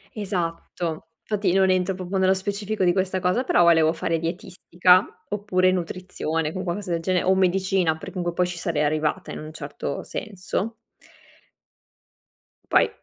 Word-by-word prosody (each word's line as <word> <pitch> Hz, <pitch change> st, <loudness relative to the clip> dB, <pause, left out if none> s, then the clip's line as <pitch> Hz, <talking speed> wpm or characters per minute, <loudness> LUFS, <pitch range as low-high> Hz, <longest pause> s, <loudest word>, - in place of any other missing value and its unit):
Esatto, 170 Hz, -4 st, -3 dB
infatti 205 Hz, -4 st, 0 dB
non 190 Hz, 0 st, +4 dB
entro 185 Hz, 0 st, +1 dB
proprio 185 Hz, +1 st, -3 dB
nello 190 Hz, 0 st, +4 dB
specifico 200 Hz, +2 st, -2 dB
di 175 Hz, -1 st, +4 dB
questa 190 Hz, 0 st, 0 dB
cosa, 185 Hz, +7 st, +1 dB
però 175 Hz, -, +4 dB
volevo 160 Hz, -1 st, +5 dB
fare 165 Hz, 0 st, -1 dB
dietistica 180 Hz, +1 st, +2 dB, 0.2 s
oppure 190 Hz, -3 st, +2 dB
nutrizione, 165 Hz, -3 st, -2 dB
con 185 Hz, -, -4 dB
qualcosa 185 Hz, +1 st, -3 dB
del 170 Hz, -1 st, 0 dB
genere, 180 Hz, +1 st, +1 dB
o 190 Hz, +1 st, +4 dB
medicina, 190 Hz, -2 st, +2 dB
perché 160 Hz, -, -9 dB
comunque 175 Hz, -2 st, -2 dB
poi 180 Hz, +1 st, +1 dB
ci 180 Hz, -1 st, -6 dB
sarei 165 Hz, -3 st, -1 dB
arrivata 150 Hz, 0 st, -1 dB
in -, -, -6 dB
un 155 Hz, 0 st, -8 dB
certo 145 Hz, -2 st, -5 dB
senso. 210 Hz, +2 st, -4 dB, 2.0 s
Poi -, -, +5 dB
180 Hz, 150 wpm, -24 LUFS, 165-190 Hz, 2.0 s, volevo